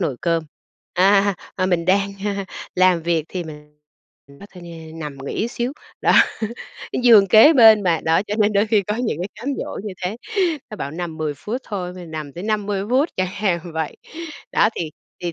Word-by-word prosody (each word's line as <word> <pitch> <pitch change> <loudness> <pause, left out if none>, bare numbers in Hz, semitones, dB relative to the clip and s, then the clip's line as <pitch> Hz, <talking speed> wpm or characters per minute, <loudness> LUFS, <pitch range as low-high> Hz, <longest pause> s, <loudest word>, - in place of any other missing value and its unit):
nồi 145 -9 -1
cơm." 165 -2 0 0.5
À, 195 +2 +4 0.2
à, 185 - +1
mình 175 -2 +1
đang, 195 +2 +2
a, 200 -1 -2 0.3
làm 185 -2 +3
việc 165 -2 0
thì 180 -2 -4
mình 150 -1 -12 0.5
nói 140 +8 -14
thôi, 180 - -11 0.3
ơ, 160 - -12
nằm 150 -3 -6
nghỉ 220 - -2
xíu, 240 +2 -3 0.3
đó. - - +3 0.9
Giường 220 -5 +8
kế 225 - +8
bên 220 -6 +7
mà, 170 -4 +1
đó, 160 +1 +3
cho 210 - -1
nên 210 0 +3
đôi 205 +2 +2
khi 215 -2 +2
có 210 +3 -3
những 235 -10 -2
cái 180 +3 -3
cám 240 +6 -6
dỗ - - -5
như 205 - -4
thế. 190 +5 -2 0.5
Nó 215 - -7
bảo 140 - -4
nằm 165 0 -5
10 155 -2 -2
phút 215 - -4
thôi, 180 -4 -4
mà 180 -1 -9
nằm 155 -3 -7
tới 175 +6 -7
50 205 -2 -1
phút 270 +6 +3
chẳng 185 0 0
hạn 190 -4 0 0.2
vậy. 160 -2 -3 0.6
Đó, - - +4
thì 160 -2 -3 0.3
thì 175 -1 -2
185 Hz, 200 wpm, -21 LUFS, 165-210 Hz, 0.9 s, Giường